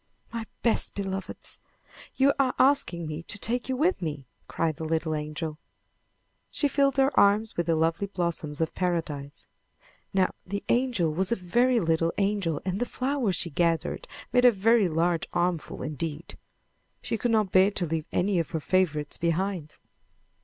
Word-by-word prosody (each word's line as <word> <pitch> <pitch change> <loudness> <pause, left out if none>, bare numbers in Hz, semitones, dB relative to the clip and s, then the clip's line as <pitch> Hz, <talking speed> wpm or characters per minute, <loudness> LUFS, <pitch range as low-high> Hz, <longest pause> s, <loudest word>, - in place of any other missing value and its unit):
"My 230 -1 -3 0.2
best 230 - +2
beloveds! 195 -1 -3 0.6
You 275 +1 +4
are 260 -2 +2
asking 260 - +3
me 155 +1 -5
to 190 - -2
take 240 +5 -1
you 260 - 0
with 335 - +1
me!" 150 -5 -4 0.2
cried 160 -2 -1
the - - -6
little 160 0 -1
angel. 155 +1 -4 0.9
She 290 - +2
filled 275 0 +2
her 270 +1 +4
arms 205 +2 +3
with 170 -1 -1
the 165 - +3
lovely 165 +5 +1
blossoms 170 -5 -3
of 160 - 0
Paradise. 160 -6 -3 0.6
Now 190 -1 +2
the 200 +2 -4
angel 235 -11 +1
was 185 +5 0
a - - +3
very 240 +7 +2
little 165 -2 +1
angel 195 -6 0
and 190 +1 -1
the 245 - -1
flowers 255 -7 -1
she 170 - -1
gathered 170 - 0 0.3
made 250 - +4
a 245 - +8
very 220 0 +3
large 170 +2 0
armful 175 -2 -1
indeed. 155 +1 -5 0.7
She - - -2
could 240 +2 -1
not 215 -4 +2
bear 190 +1 +6
to 195 -3 -1
leave 160 -1 -3
any 185 0 +1
of 165 - -2
her 165 - -2
favorites 155 -4 0
behind. 170 -1 -1
180 Hz, 165 wpm, -27 LUFS, 160-225 Hz, 0.9 s, a